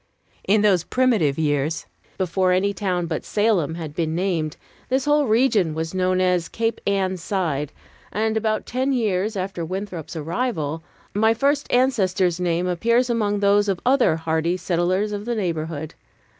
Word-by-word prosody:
In 205 +1 +4
those 190 -5 +4
primitive 220 - +2
years, 150 0 0 0.3
before 185 0 +1
any 200 +2 +1
town 180 -3 -1
but 165 -2 -3
Salem 205 -8 +1
had 160 -3 -6
been 160 0 -1
named, 170 -4 -1 0.3
this 265 +2 +1
whole 295 -1 +3
region 215 -8 +2
was 160 +1 -3
known 185 0 +1
as 180 -2 +1
Cape 225 0 -2
Ann 190 -2 +1
Side; 165 -6 -2 0.4
and 220 +1 0
about 220 -1 0
ten 260 +3 -1
years 215 -3 0
after 185 -2 -3
Winthrop's 185 -2 -5
arrival, 160 - -2 0.3
my 220 +2 +3
first 285 +4 0
ancestor's 195 -9 +2
name 175 0 0
appears 235 +8 +1
among 205 -3 0
those 205 +1 +3
of 190 -3 0
other 255 -10 +4
hardy 160 +2 0
settlers 185 +4 0
of 205 0 -4
the 240 0 -1
neighborhood. 160 -6 -3
185 Hz, 155 wpm, -22 LUFS, 165-220 Hz, 0.4 s, In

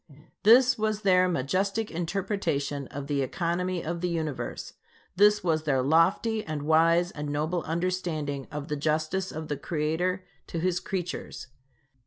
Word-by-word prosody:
This 245 +3 +6
was 215 -1 -1
their 185 -2 +5
majestic 190 +9 -1
interpretation 165 -6 -2
of 140 0 -6
the 140 -1 0
economy 175 +5 -1
of 170 +1 -3
the 180 - 0
Universe. 160 -5 -4 0.4
This 210 +1 +5
was 160 -3 +1
their 135 -4 +2
lofty, 180 - +2
and 155 -2 -4
wise, 165 +3 +4
and 150 0 -5
noble 155 +4 -1
understanding 165 -5 -2
of 150 0 -5
the 150 - -2
justice 155 +5 -1
of 155 0 -6
the 145 - -2
Creator 175 +5 -1 0.2
to - - -5
his 180 +1 +1
creatures. 180 -8 -5
170 Hz, 145 wpm, -27 LUFS, 150-185 Hz, 0.4 s, This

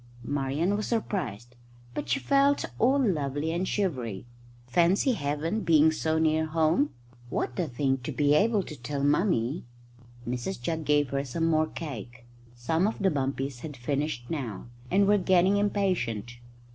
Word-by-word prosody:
Marian 145 +7 0
was 210 - -2
surprised, 125 - -3 0.4
but - - -4
she 275 - +2
felt 280 +1 +3
all 260 +5 +4
lovely 155 - 0
and 175 +3 -1
shivery. 125 - -2 0.4
Fancy 175 - +3
Heaven 150 +3 -1
being 160 -3 +5
so 160 0 0
near 160 0 +2
home! 155 -1 +2 0.4
What 125 - -2
a 175 - 0
thing 135 0 0
to 125 - -5
be 145 -1 +2
able 210 +5 +3
to 155 - -8
tell 140 +2 -4
Mummy! 145 - +1 0.6
Mrs 125 +8 -3
Jugg 160 +5 -3
gave 145 -2 +2
her 140 0 0
some 165 +5 -2
more 155 -1 +2
cake. 125 - -8 0.3
Some 160 +10 +1
of 220 - -2
the 195 -2 +2
bumpies 135 -2 -2
had 145 +1 -8
finished 135 0 -2
now, 125 - -4 0.2
and 200 +2 +4
were 205 +1 +4
getting 185 +2 +3
impatient. 180 - -1
155 Hz, 155 wpm, -28 LUFS, 135-185 Hz, 0.6 s, being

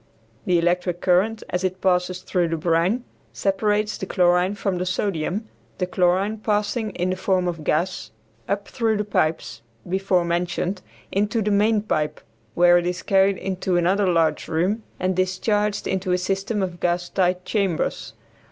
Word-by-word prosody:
The 180 -1 +4
electric 175 +1 0
current, 195 +6 +2
as 180 +1 -1
it 185 0 -1
passes 180 -1 +1
through 175 -2 0
the 165 0 -2
brine, 170 +9 +1 0.3
separates 210 +2 0
the 190 - -4
chlorine 180 +2 +2
from 195 -4 -2
the 180 - -1
sodium, 190 +2 -2 0.3
the 180 - 0
chlorine 185 +4 +1
passing 215 +1 0
in 180 +1 0
the - - 0
form 185 -1 0
of 165 -3 -4
gas 175 +5 -1 0.4
up 200 0 -1
through 225 -3 0
the 210 - 0
pipes, 155 - -1 0.3
before 185 -1 +1
mentioned, 175 +2 -1 0.3
into 205 +3 0
the 210 - 0
main 210 +1 +3
pipe, 150 -7 -1 0.4
where 175 0 +6
it 175 - -3
is 180 0 -3
carried 195 0 +3
into 185 -1 -1
another 190 +3 +2
large 165 -3 +1
room 185 +8 0 0.2
and 185 0 0
discharged 205 +3 0
into 190 -1 -1
a - - +3
system 195 +3 -1
of 175 -2 -4
gas 175 0 0
tight 180 0 0
chambers. 190 - -1
185 Hz, 160 wpm, -23 LUFS, 175-200 Hz, 0.4 s, where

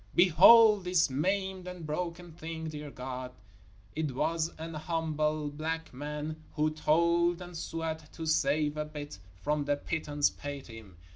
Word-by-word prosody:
_ - - -20
Behold 200 +5 +8
this 180 -5 +3
maimed 190 +5 -1
and 180 -3 -7
broken 170 +2 -4
thing; 160 0 -6
dear 150 -1 -7
God, 125 -1 -6 0.6
it 155 -3 -1
was 165 +5 0
an 165 +1 -6
humble 155 -2 -1
black 160 +1 -4
man 150 +3 -5 0.2
who 155 0 +2
toiled 170 +3 +2
and 180 -1 -9
sweat 160 -1 -4
to 165 - -6
save 155 -1 +1
a 150 - -1
bit 145 -8 -8 0.2
from 150 0 0
the 145 0 +1
pittance 145 -1 0
paid 145 -1 -7
him. 110 -6 -12
155 Hz, 150 wpm, -30 LUFS, 150-170 Hz, 0.6 s, Behold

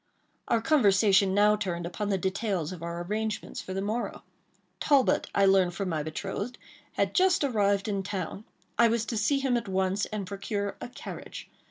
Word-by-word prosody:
Our 230 - +2
conversation 200 - +4
now 210 +1 +5
turned 180 -5 -3
upon 200 +4 -3
the 195 - +2
details 190 -3 -1
of 180 -3 -8
our 170 +1 -4
arrangements 215 +3 -3
for 185 - -6
the 195 - -1
morrow. 220 +4 -3 0.6
Talbot, 280 -3 +3
I 200 - +5
learned 190 -2 +4
from 195 -2 -2
my 160 -3 -1
betrothed, 195 +9 -4 0.4
had - - 0
just 370 -4 +3
arrived 205 -6 +1
in 200 -2 -1
town. 195 +1 -5 0.3
I 235 - +7
was 225 -1 0
to 230 - -3
see 225 +7 +2
him 270 -2 +1
at 230 -2 -4
once, 190 +1 0
and 215 -2 -4
procure 200 +1 -3
a - - -6
carriage. - - -9
200 Hz, 180 wpm, -28 LUFS, 190-220 Hz, 0.6 s, I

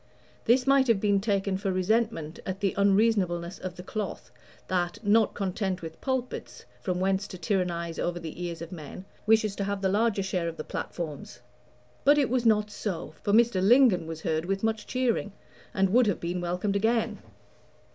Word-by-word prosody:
This 250 +2 +4
might 275 -1 +4
have 230 -4 +3
been 200 -1 +2
taken 195 -2 0
for 195 0 -2
resentment 185 -4 0
at 190 0 -4
the 200 -2 0
unreasonableness 195 -4 +2
of 185 -1 -6
the 180 - -9
cloth, 210 +2 -5 0.4
that, 175 -1 -1
not 220 +1 +3
content 190 -1 -2
with 160 0 -8
pulpits, 260 -2 -4 0.2
from 180 -1 -2
whence 195 +1 0
to 185 - -8
tyrannize 170 -2 -1
over 175 0 -1
the 165 +1 -7
ears 170 -1 -4
of 170 - -9
men, 170 +2 -8 0.2
wishes 215 -2 +3
to 200 - -1
have 200 0 -3
the 190 - +3
larger 205 0 +1
share 180 -3 -1
of 165 - -5
the - - -4
platforms; 150 -9 -6 0.6
but 290 +1 +6
it 275 -5 +2
was 250 -2 +2
not 210 -1 +3
so, 175 -8 -4
for 205 - -1
Mr. 225 -3 +4
Lingon 205 -5 +5
was 160 -1 -6
heard 160 +1 -1
with 195 +2 -2
much 220 -1 -1
cheering, 240 -5 0 0.4
and 195 -1 +1
would 245 -1 +5
have 200 - 0
been 175 +1 -3
welcomed 180 +3 -1
again. 225 0 +1
195 Hz, 185 wpm, -28 LUFS, 175-220 Hz, 0.6 s, but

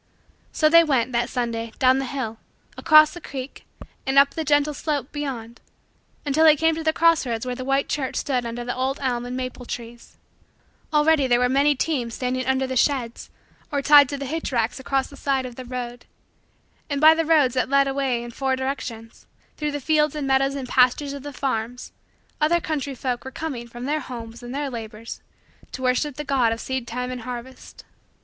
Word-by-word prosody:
So 310 - +3
they 335 +2 +7
went, 260 -6 +1
that 240 0 0
Sunday, 230 -2 -3
down 260 0 +4
the 270 - -2
hill, 240 -4 -4 0.4
across 310 -1 +6
the 350 - -9
creek, 270 -2 -8 0.4
and 270 0 -1
up 280 0 +7
the 320 - -3
gentle 295 0 +2
slope 290 -2 -3
beyond, 250 -6 -5 0.6
until 295 +2 +2
they 310 -1 +8
came 325 +2 +2
to 320 +1 -4
the 315 - +3
cross 330 0 +3
roads 235 -2 -3
where 250 - -2
the 255 +1 -6
white 270 +1 +1
church 270 -3 -2
stood 255 -3 -1
under 235 +1 -5
the 245 - -3
old 260 +2 -1
elm 245 -3 -1
and 250 +1 -4
maple 255 -1 -5
trees. 235 0 -8 0.7
Already 300 -2 +3
there 240 -1 +4
were 250 0 +2
many 280 +3 +3
teams 255 -5 -2
standing 255 0 -2
under 265 0 +1
the 260 0 -4
sheds 250 -2 0 0.4
or 285 -1 -1
tied 290 -2 +7
to 285 - -3
the 275 - -5
hitch 320 +3 -3
racks 235 0 0
along 270 0 0
the 280 - -13
side 270 -2 0
of 250 -2 -8
the 255 - -8
road. 245 -1 -6 0.8
And 285 -1 -1
by 310 +2 +8
the 325 0 0
roads 305 -6 +3
that 255 0 0
led 275 0 +4
away 270 -3 -1
in 240 - -8
four 265 +2 -1
directions, 255 -4 -6 0.3
through 300 -1 -2
the 290 - -3
fields 300 +1 +1
and 295 -2 -3
meadows 270 +1 +2
and 270 -2 -5
pastures 255 +3 +2
of 280 - -7
the 290 +1 -7
farms, 250 -3 -3 0.5
other 330 +3 +3
country 285 -4 -3
folk 250 -1 -3
were 265 - -6
coming 265 -4 -5
from 240 +1 -8
their 300 +3 0
homes 235 -3 -8
and 245 +2 -7
their 285 -1 -2
labors 225 -1 -7 0.5
to 260 - -6
worship 255 +3 +1
the 295 - -5
God 260 -5 +2
of 230 - -3
seedtime 250 -1 -4
and 250 -1 -5
harvest. 250 +2 -9
265 Hz, 205 wpm, -23 LUFS, 245-290 Hz, 0.8 s, they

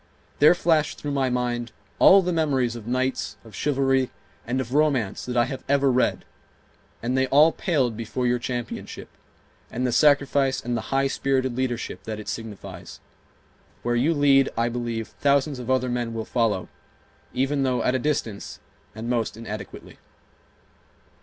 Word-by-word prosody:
There 150 +4 +7
flashed 160 -4 +1
through 145 - -4
my 135 -2 +1
mind 120 -1 -2 0.3
all 195 0 +7
the 180 0 -1
memories 135 -7 +1
of 115 -2 -9
Knights 130 +2 -1
of 110 - -14
chivalry 135 +1 +1 0.4
and 125 +2 -1
of 125 -1 -4
romance 140 -9 +1
that 125 -1 -2
I 120 - +4
have 135 - -6
ever 140 -1 +3
read, 125 0 +1 0.8
and 125 +2 0
they 130 0 +2
all 150 +5 +6
paled 135 -12 0
before 115 +3 -3
your 125 0 +2
championship, 120 -1 -5 0.6
and 125 +2 -2
the 125 - +1
sacrifice 140 -1 +3
and 120 0 -3
the 110 -1 -4
high 135 0 +2
spirited 135 -2 0
leadership 125 -2 -3
that 110 -1 -5
it 105 - -9
signifies. 100 -6 -8 0.8
Where 120 0 0
you 145 +8 +2
lead, 140 -2 +4
I 115 +1 +1
believe, 115 -2 -3
thousands 140 +1 +1
of 125 0 -7
other 130 -1 +2
men 120 -2 -2
will 110 -1 -3
follow, 110 -6 0 0.6
even 135 +2 0
though 125 -3 +1
at 125 - +2
a 130 - +1
distance, 120 -7 -3 0.4
and 110 +1 -6
most 115 -3 -1
inadequately 105 -3 -8
125 Hz, 160 wpm, -24 LUFS, 115-135 Hz, 0.8 s, There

